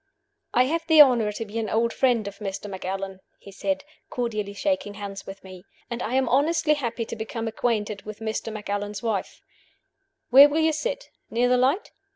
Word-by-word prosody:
"I 250 - +6
have 330 +5 -2
the 320 -2 +6
honor 245 -7 +7
to 225 - -5
be 220 +2 -4
an 220 -2 -2
old 230 +2 +1
friend 240 -5 +2
of 200 0 -8
Mr. 200 0 -5
Macallan," 190 0 -5 0.2
he 200 - -13
said, 285 +8 -2 0.3
cordially 215 -5 -3
shaking 280 -3 -1
hands 200 -1 -7
with 195 0 -9
me; 185 -1 -11 0.3
"and 235 +1 -3
I 240 - -2
am 265 0 +2
honestly 305 +3 +3
happy 240 -5 -3
to - - -6
become 225 +1 -4
acquainted 215 -3 -1
with 215 0 -8
Mr. 220 0 -4
Macallan's 205 0 -4
wife. 220 -5 -3 0.9
Where 275 +3 +10
will 295 - -1
you 315 0 +3
sit? - - -4 0.2
Near 240 +2 +2
the 250 - +4
light? 270 +10 +1
225 Hz, 190 wpm, -25 LUFS, 205-265 Hz, 0.9 s, Where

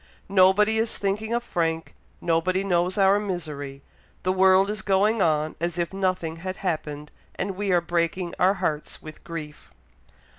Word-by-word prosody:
Nobody 200 +3 +4
is 225 0 0
thinking 205 +3 -2
of 235 0 0
Frank 165 -6 -2 0.3
nobody 175 +3 +1
knows 180 0 +1
our 195 +1 +5
misery 150 -8 -5 0.4
the 185 - +2
world 190 +1 +5
is 210 -1 -2
going 200 +3 +2
on 155 -2 +1
as 170 0 -1
if 175 +1 -2
nothing 185 -4 -1
had 185 +3 -5
happened, 150 -3 -3 0.2
and 200 - -2
we 195 +1 -2
are 175 -1 +4
breaking 170 +1 -1
our 190 +2 +4
hearts 160 -6 -3
with 155 0 -11
grief!" 155 -3 -8
185 Hz, 155 wpm, -25 LUFS, 165-195 Hz, 0.4 s, our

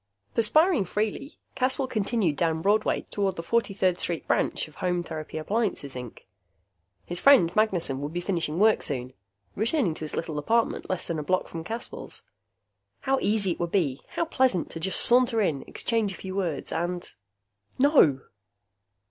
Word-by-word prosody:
Perspiring 305 - +3
freely, 215 - -3 0.2
Caswell 260 0 0
continued 215 - 0
down 160 0 0
Broadway 210 +2 +2
toward 195 -2 0
the 165 - -5
43rd 195 -4 +1
Street 170 -2 -2
branch - - 0
of 155 - -17
Home 180 -1 0
Therapy 155 -1 -6
Appliances, 190 - -1
Inc. 125 -3 -8 0.8
His 175 0 -5
friend 185 -12 +5
Magnessen 180 -11 +1
would 145 +1 -4
be 175 - -3
finishing 170 -4 -2
work 215 +3 +4
soon, 130 -3 -3 0.4
returning 225 - +1
to - - -8
his 155 -1 -5
little 160 -3 -3
apartment 230 +9 0
less 185 -1 0
than 165 -2 -3
a - - -3
block 185 +5 0
from 165 -1 -6
Caswell's. 230 +7 -6 0.8
How 270 0 +1
easy 205 -3 +2
it - - -4
would 170 - -1
be, 145 -9 0
how 335 - +1
pleasant, 260 - +1
to 170 +4 -3
saunter 240 0 +4
in, 160 -10 +1
exchange 225 -4 -1
a - - -9
few 190 +2 -7
words 175 -7 -2
and.... 175 +2 -2 0.7
No! 255 - +5
185 Hz, 160 wpm, -26 LUFS, 165-225 Hz, 0.8 s, friend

